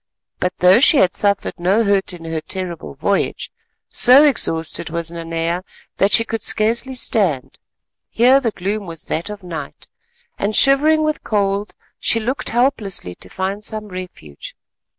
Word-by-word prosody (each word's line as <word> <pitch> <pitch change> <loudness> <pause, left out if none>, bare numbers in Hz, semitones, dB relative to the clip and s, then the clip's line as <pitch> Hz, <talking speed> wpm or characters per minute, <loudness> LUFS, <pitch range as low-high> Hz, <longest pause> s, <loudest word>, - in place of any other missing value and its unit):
But 180 0 -2
though 180 +4 +5
she 285 +3 +5
had 185 -7 +3
suffered 200 -1 0
no 195 +6 +2
hurt 200 -2 +1
in 170 -2 -10
her 160 -1 -3
terrible 175 -5 -5
voyage, 195 +8 -1 0.4
so 255 +4 +6
exhausted 165 - 0
was 170 0 -4
Nanea 165 +1 -3 0.3
that 200 +1 +2
she 230 +3 +5
could 225 -1 -4
scarcely 230 +5 +1
stand. 190 - -1 0.5
Here 255 +4 +4
the 245 -4 -1
gloom 200 0 -4
was 165 -2 -7
that 165 +6 -3
of 210 -2 -8
night, 160 -5 -8 0.5
and 210 +2 -1
shivering 300 +3 +4
with 310 0 -2
cold 200 -1 -1 0.2
she 230 - +1
looked 250 +5 -3
helplessly 225 - -1
to - - -9
find 195 +2 -4
some 215 -1 -5
refuge. 180 - -9
200 Hz, 150 wpm, -19 LUFS, 170-230 Hz, 0.5 s, so